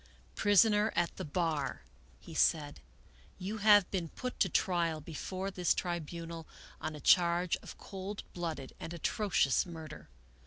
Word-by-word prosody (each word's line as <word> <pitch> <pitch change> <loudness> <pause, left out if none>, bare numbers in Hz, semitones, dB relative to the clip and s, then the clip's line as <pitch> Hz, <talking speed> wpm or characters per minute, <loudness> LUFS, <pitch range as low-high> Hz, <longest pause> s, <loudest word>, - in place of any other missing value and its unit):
" - - -29
Prisoner 210 +1 +4
at 170 0 +1
the - - -4
bar," 155 - -1 0.4
he - - -11
said, 145 -3 +2 0.3
" 65 +1 -27
you 200 +4 -4
have 205 -2 +6
been 175 -4 -2
put 250 +9 -6
to - - +3
trial 170 -4 +1
before 185 +5 -5
this 180 -2 +1
tribunal 170 -1 -4 0.3
on 155 0 -3
a - - -8
charge 175 +2 +4
of - - -11
cold 195 +1 -6
blooded 160 -6 -4
and 170 - -6
atrocious 170 -5 +2
murder. 165 -3 -9
175 Hz, 150 wpm, -33 LUFS, 160-195 Hz, 0.4 s, have